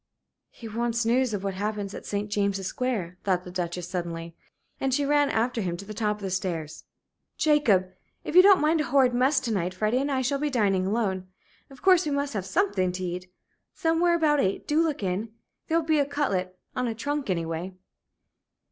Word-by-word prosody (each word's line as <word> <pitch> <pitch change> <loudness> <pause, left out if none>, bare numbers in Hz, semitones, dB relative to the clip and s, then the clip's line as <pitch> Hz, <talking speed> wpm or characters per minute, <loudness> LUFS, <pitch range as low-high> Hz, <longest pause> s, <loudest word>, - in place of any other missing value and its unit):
"He 230 - -10
wants 235 +1 -1
news 250 +1 +2
of 200 -2 -3
what 195 -1 -2
happens 205 0 -3
at - - -8
St. 205 0 -2
James's 200 -2 -1
Square," 190 -7 -3
thought 185 -2 +1
the 180 - -9
Duchess, 180 -1 -3
suddenly, 170 -2 -5 0.4
and 270 - 0
she 280 +2 +1
ran 290 0 +3
after 235 +1 0
him 175 -3 -2
to 200 - -9
the 215 - -7
top 210 -1 0
of 210 - -13
the 190 - -3
stairs. 170 -4 -3 0.5
"Jacob! 220 -12 +3 0.3
If - - -5
you 365 - +11
don't 390 0 +6
mind 310 +1 +3
a - - -1
horrid 265 -3 +3
mess 260 +4 +3
to 235 - -3
night, 185 -3 -1
Freddie 215 +6 +1
and 285 +1 -1
I 260 -1 0
shall 275 +2 0
be 300 +1 0
dining 195 -7 +1
alone 195 -4 -1 0.4
of 270 -2 -16
course 370 -2 +6
we 300 - -1
must 280 -1 -1
have 195 -3 -3
something 195 - +1
to 185 +1 -4
eat. 180 +1 -5 0.4
Somewhere 335 +1 +2
about 305 -3 +3
eight. 195 -6 -1
Do 305 +2 +3
look 310 -9 -1
in. 195 +4 -2 0.3
There'll 330 +1 +2
be 310 -1 +2
a 285 - +3
cutlet 195 -11 -1 0.2
on 250 -1 0
a 225 - -3
trunk 285 +2 -3
anyway." 170 +1 -2
220 Hz, 205 wpm, -26 LUFS, 185-285 Hz, 0.5 s, you